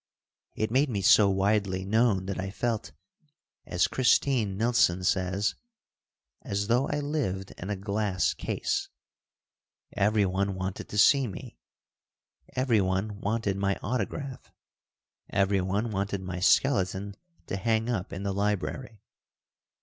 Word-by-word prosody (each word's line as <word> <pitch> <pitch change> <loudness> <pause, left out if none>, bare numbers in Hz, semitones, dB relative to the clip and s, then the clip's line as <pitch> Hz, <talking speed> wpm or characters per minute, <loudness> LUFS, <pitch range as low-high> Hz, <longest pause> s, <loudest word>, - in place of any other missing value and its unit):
It 110 0 -1
made 135 +4 +3
me 100 -5 -2
so 100 +1 +6
widely 95 -1 +1
known 105 -2 +2
that 95 0 -4
I 95 +1 -3
felt, 110 0 -2 0.8
as 90 0 +2
Christine 120 -5 +2
Nilsson 110 -6 +2
says, 95 +2 +1 0.9
"as 100 +1 -2
though 120 +5 +2
I 145 - -1
lived 130 -11 -2
in 95 - -6
a 105 - -1
glass 100 -1 0
case." - - -2 1.0
Everyone 100 -1 +1
wanted 95 +1 -5
to 105 - -5
see 135 +4 +5
me. 95 - -9 1.0
Everyone 105 -5 +1
wanted 105 -2 -1
my 100 0 0
autograph. 130 +3 -4 0.8
Everyone 100 +2 0
wanted 100 -1 -2
my 90 -1 -5
skeleton 100 -2 +2 0.3
to - - -4
hang 110 +2 0
up 105 -6 -2
in 95 - -5
the 100 -1 -1
library. 105 +3 -2
100 Hz, 120 wpm, -28 LUFS, 95-115 Hz, 1.0 s, so